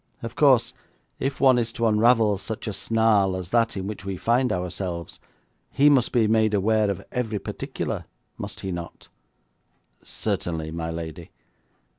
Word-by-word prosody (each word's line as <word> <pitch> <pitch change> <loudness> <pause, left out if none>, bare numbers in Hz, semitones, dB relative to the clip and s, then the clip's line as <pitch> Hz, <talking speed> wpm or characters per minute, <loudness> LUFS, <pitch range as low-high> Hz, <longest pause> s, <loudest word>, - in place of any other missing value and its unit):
Of 115 +1 -6
course, 135 -5 +4 0.5
if 135 0 -2
one 130 -3 +5
is 115 -1 -1
to 115 - -1
unravel 110 -1 +4
such 110 +2 -6
a 105 - -2
snarl 100 -1 +2
as 90 -2 -5
that 115 -1 +1
in 95 - -3
which 105 -1 -6
we 95 -1 -4
find 125 +6 +2
ourselves, 90 -1 -4 0.5
he 145 +1 +4
must 130 -4 +3
be 120 -3 +3
made 110 -1 +3
aware 105 +1 +2
of 100 - -4
every 115 -4 -2
particular, - - -5 0.3
must - - -7
he 95 - -4
not?' 85 -1 -7 0.9
'Certainly, 80 -2 -3
my 80 0 -4
lady.' 80 -2 -6
105 Hz, 155 wpm, -24 LUFS, 95-115 Hz, 0.9 s, one